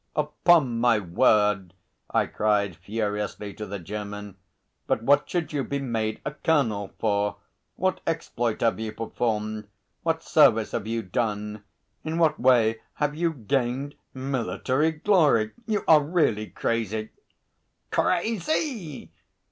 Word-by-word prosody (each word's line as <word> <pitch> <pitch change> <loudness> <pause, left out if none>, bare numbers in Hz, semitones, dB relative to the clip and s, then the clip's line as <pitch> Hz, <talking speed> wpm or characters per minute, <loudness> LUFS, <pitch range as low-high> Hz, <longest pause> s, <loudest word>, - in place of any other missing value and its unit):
"Upon 150 -4 +3
my 120 -1 +4
word!" 95 0 +2 0.3
I - - +2
cried 105 -4 0
furiously 105 +1 -3
to 105 - -7
the 100 - -4
German. 105 +1 -6 0.5
"But 115 - 0
what 140 +4 +3
should 170 -3 -2
you 140 -2 0
be 140 - -2
made 115 -5 -2
a - - -1
colonel 120 -11 0
for? 100 -1 0 0.4
What 185 0 0
exploit 120 -8 -1
have 115 -2 +2
you 110 -1 -4
performed? 110 -2 -2 0.3
What 165 -1 -1
service 115 -8 +4
have 110 -2 -3
you 115 0 -2
done? 105 +1 -2 0.4
In 160 +1 -3
what 165 -2 +3
way 115 -3 +4
have 150 0 0
you 165 +2 0
gained 135 +1 -1 0.2
military 130 - 0
glory? 150 - +3 0.2
You 215 -2 0
are 155 -2 +7
really 145 -9 +1
crazy!" 110 -1 -2 0.8
"Crazy!" 215 - -1
115 Hz, 125 wpm, -26 LUFS, 105-150 Hz, 0.8 s, are